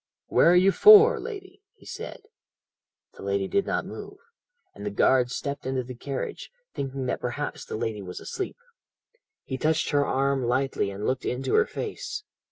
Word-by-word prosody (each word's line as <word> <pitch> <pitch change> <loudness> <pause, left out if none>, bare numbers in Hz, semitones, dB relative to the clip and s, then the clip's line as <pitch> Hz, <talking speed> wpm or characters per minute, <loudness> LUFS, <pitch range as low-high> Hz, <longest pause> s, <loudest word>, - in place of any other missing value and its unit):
"'Where - - +5
are 175 - +6
you 185 +2 +5
for, 430 - +8
lady?' 400 -3 -8
he - - -21
said. - - -7 0.9
"The - - -14
lady 100 0 -1
did 200 - 0
not - - -1
move, - - -9 0.6
and - - -10
the 105 - -2
guard 125 +4 +3
stepped 140 +3 -4
into 130 -1 -1
the 125 +1 -8
carriage, 135 +2 -5 0.2
thinking 135 -1 -4
that - - -2
perhaps 125 +4 -4
the - - -5
lady 110 -2 -3
was 90 -2 -7
asleep. 385 - -5 0.9
He 130 -1 -5
touched 155 +2 +1
her 145 -1 +3
arm 135 -1 0
lightly 130 -3 0
and 100 +2 -5
looked 130 0 -1
into 125 +2 -2
her 445 +1 +4
face. 425 -1 -5
135 Hz, 175 wpm, -26 LUFS, 125-180 Hz, 0.9 s, for